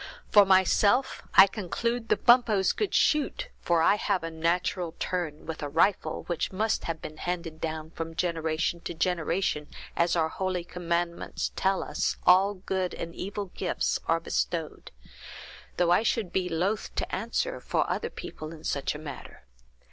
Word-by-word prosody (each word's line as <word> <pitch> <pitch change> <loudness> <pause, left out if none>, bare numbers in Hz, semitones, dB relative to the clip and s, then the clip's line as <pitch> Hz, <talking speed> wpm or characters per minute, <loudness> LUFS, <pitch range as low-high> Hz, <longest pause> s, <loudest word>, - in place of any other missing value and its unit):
For 205 -2 +7
myself, 200 +7 +3
I 190 - +11
conclude 225 +4 -3
the - - +4
Bumppos 235 -6 +4
could 425 - -1
shoot, 315 - +2
for 170 -2 +2
I 205 - +5
have 185 -4 0
a 165 - -4
natural 170 +1 -1
turn 165 -5 -3
with 160 -1 -6
a 145 - -3
rifle, 170 +6 +1
which 175 -2 -2
must 215 +3 0
have 165 -1 -4
been 155 - -7
handed 170 -2 -4
down 160 0 -4
from 165 -1 -6
generation 165 -1 -1
to 170 - -6
generation, 170 -2 0 0.3
as, 170 +1 +2
our 160 -2 +2
holy 185 0 -2
commandments 170 0 -2
tell 190 0 +1
us, - - -1
all 195 +3 +5
good 185 -1 -2
and 170 0 -6
evil 200 +1 -5
gifts 180 - -1
are 165 0 +3
bestowed; 165 -1 -3 0.9
though 175 -1 +3
I 175 - +5
should 220 -4 -1
be 185 -1 0
loath 185 +6 -1
to - - -2
answer 355 - -2
for - - 0
other - - -2
people 155 0 -8
in 160 -2 -11
such 140 +1 -1
a - - -4
matter. 150 -3 -9
175 Hz, 165 wpm, -28 LUFS, 165-195 Hz, 0.9 s, I